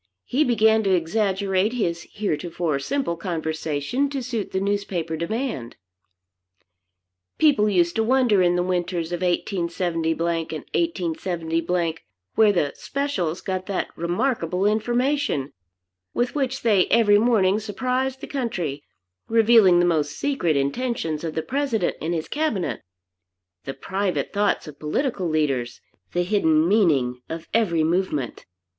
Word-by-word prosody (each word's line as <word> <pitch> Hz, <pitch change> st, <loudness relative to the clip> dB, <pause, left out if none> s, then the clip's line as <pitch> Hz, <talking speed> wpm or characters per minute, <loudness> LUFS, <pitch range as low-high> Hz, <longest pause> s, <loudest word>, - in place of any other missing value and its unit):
He 280 Hz, +5 st, +2 dB
began 220 Hz, -3 st, +4 dB
to 195 Hz, -3 st, +2 dB
exaggerate 195 Hz, +3 st, 0 dB
his 175 Hz, -8 st, -2 dB
heretofore 170 Hz, -5 st, -2 dB
simple 265 Hz, -, -1 dB
conversation 160 Hz, -, -2 dB
to 275 Hz, -2 st, -3 dB
suit 235 Hz, -5 st, -3 dB
the 190 Hz, -, 0 dB
newspaper 195 Hz, -5 st, -2 dB
demand. 170 Hz, -, -3 dB, 1.6 s
People 275 Hz, -9 st, +4 dB
used 175 Hz, -3 st, +2 dB
to 225 Hz, -, +3 dB
wonder 240 Hz, -4 st, +3 dB
in 175 Hz, -1 st, +3 dB
the 175 Hz, -, +1 dB
winters 175 Hz, -2 st, -2 dB
of 175 Hz, -, -3 dB
187 175 Hz, -2 st, -1 dB
and 160 Hz, 0 st, 0 dB
187, 170 Hz, -, -1 dB, 0.4 s
where 220 Hz, -2 st, +5 dB
the 150 Hz, -7 st, 0 dB
"Specials" 195 Hz, -, -2 dB
got 185 Hz, -1 st, -3 dB
that 200 Hz, -, -3 dB
remarkable 180 Hz, 0 st, -1 dB
information 240 Hz, -, 0 dB, 0.6 s
with 245 Hz, 0 st, 0 dB
which 270 Hz, -3 st, -2 dB
they 205 Hz, -6 st, +4 dB
every 205 Hz, -3 st, +5 dB
morning 210 Hz, -4 st, +3 dB
surprised 255 Hz, +5 st, -2 dB
the -, -, -5 dB
country, 180 Hz, -, -3 dB, 0.5 s
revealing 225 Hz, -5 st, +6 dB
the 175 Hz, -, +4 dB
most 150 Hz, -4 st, 0 dB
secret 180 Hz, -, 0 dB
intentions 160 Hz, -, -1 dB
of 160 Hz, -2 st, -4 dB
the 160 Hz, -, -1 dB
President 265 Hz, -8 st, -1 dB
and 170 Hz, +2 st, -1 dB
his 160 Hz, -, -3 dB
cabinet, 290 Hz, -, -1 dB, 0.8 s
the 135 Hz, -, -5 dB
private 190 Hz, +6 st, -2 dB
thoughts 205 Hz, -4 st, +1 dB
of 150 Hz, -, -10 dB
political 185 Hz, -, -1 dB
leaders, 135 Hz, -6 st, -1 dB, 0.3 s
the 175 Hz, -, +1 dB
hidden 165 Hz, -5 st, +3 dB
meaning 145 Hz, -, +2 dB
of 165 Hz, 0 st, -6 dB
every 175 Hz, -8 st, +2 dB
movement. 160 Hz, -6 st, -1 dB
185 Hz, 130 wpm, -23 LUFS, 165-225 Hz, 1.6 s, revealing